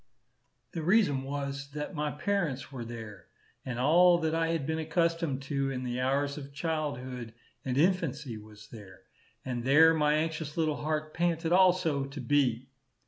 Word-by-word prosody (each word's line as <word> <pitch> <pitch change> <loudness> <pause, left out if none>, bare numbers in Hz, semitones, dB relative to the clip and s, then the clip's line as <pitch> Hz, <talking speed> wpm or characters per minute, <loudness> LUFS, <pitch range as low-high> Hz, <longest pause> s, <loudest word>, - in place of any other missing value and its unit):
The 165 - -4
reason 175 -6 +3
was, 140 0 -4
that 150 +4 -5
my 150 -2 -1
parents 150 -5 -2
were 130 -3 -6
there, 110 -5 -9 0.4
and 125 -2 -4
all 175 +7 +5
that 160 0 0
I 165 0 +1
had 165 -4 -1
been 160 +1 -1
accustomed 165 -3 0
to 140 -1 -1
in 130 -1 -4
the 125 0 -3
hours 140 +3 0
of 140 -1 -10
childhood 130 -7 -3 0.3
and 130 -1 -2
infancy 150 -7 +1
was 105 0 -13
there; 100 -5 -12 0.4
and 125 -2 -3
there 155 +5 +6
my 150 -1 +2
anxious 155 -1 -2
little 155 -2 +1
heart 155 0 -2
panted 165 -1 0
also 180 -6 +3
to 135 +1 -8
be. 130 -2 +1
145 Hz, 160 wpm, -30 LUFS, 130-160 Hz, 0.4 s, there